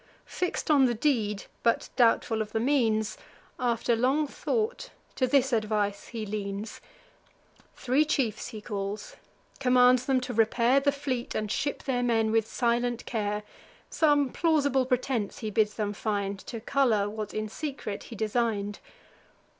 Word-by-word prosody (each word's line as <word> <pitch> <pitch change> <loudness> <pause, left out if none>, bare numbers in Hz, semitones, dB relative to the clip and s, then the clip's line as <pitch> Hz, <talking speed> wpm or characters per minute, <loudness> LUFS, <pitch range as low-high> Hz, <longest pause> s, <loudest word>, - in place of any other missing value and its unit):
Fix'd 360 -3 -2
on 280 -3 +6
the 240 -2 +1
deed, 215 -6 0 0.2
but 230 -1 +1
doubtful 230 -2 +3
of 215 0 -5
the 220 - +1
means, 225 -4 +1 0.4
After 240 -1 +1
long 265 +6 +2
thought, 460 - -2 0.2
to 255 - +1
this 270 -1 +3
advice 210 -2 0
he 225 -2 -5
leans: 205 0 -5 0.9
Three 265 +4 +2
chiefs 265 -8 -1
he 215 -3 -8
calls, 205 - -5 0.4
commands 250 -1 +4
them 265 -2 +3
to 250 0 -4
repair 235 +4 +3
The 285 +1 +2
fleet, 270 -3 -3
and 215 -1 -2
ship 285 - -2
their 255 -3 0
men 225 -2 +2
with 225 -1 +2
silent 240 0 0
care; 210 -2 -2 0.5
Some 290 -4 +3
plausible 285 -6 +2
pretence 250 -4 -1
he 220 -3 -4
bids 210 0 +1
them 205 -2 -2
find, 200 -2 -2
To 230 - -5
colour 225 -4 +2
what 215 0 -5
in 215 0 -2
secret 265 -4 -5
he 235 - -9
design'd. 215 -2 -1
235 Hz, 145 wpm, -28 LUFS, 215-265 Hz, 0.9 s, on